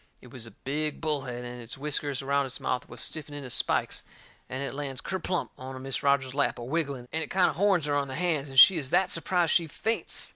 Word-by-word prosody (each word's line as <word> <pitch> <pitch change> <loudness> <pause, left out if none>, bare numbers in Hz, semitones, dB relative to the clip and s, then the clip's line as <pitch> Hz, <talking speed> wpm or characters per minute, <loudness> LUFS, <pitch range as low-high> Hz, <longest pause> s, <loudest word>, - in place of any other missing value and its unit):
It 125 - -15
was 120 -3 -6
a - - -11
big 150 +2 -2
bullhead, 135 -6 -3
and 125 0 -7
its 115 +2 -8
whiskers 145 -1 -1
around 140 0 +1
its 130 - -6
mouth 125 - -2
was - - -4
stiffened 150 -2 -1
into 135 -3 -7
spikes, - - +1 0.5
and 130 +2 -3
it 140 - -4
lands 135 -2 -4
kerplump 185 +5 -2
into 130 0 -7
Mis' 135 0 -3
Rogers's 140 -2 +2
lap, 140 0 +1
a 120 - -6
wiggling, 140 -2 -2
and 160 - -1
it - - -8
kind 185 -1 +3
o' - - -8
horns 185 -1 +2
her 145 - 0
on 140 -1 +1
the 130 - -6
hands, 155 -4 0
and 135 -1 +4
she 190 - +10
is 135 -4 -3
that 190 - +3
surprised 170 0 +2
she 170 -3 +3
faints. 225 +9 0
140 Hz, 240 wpm, -28 LUFS, 130-160 Hz, 0.5 s, she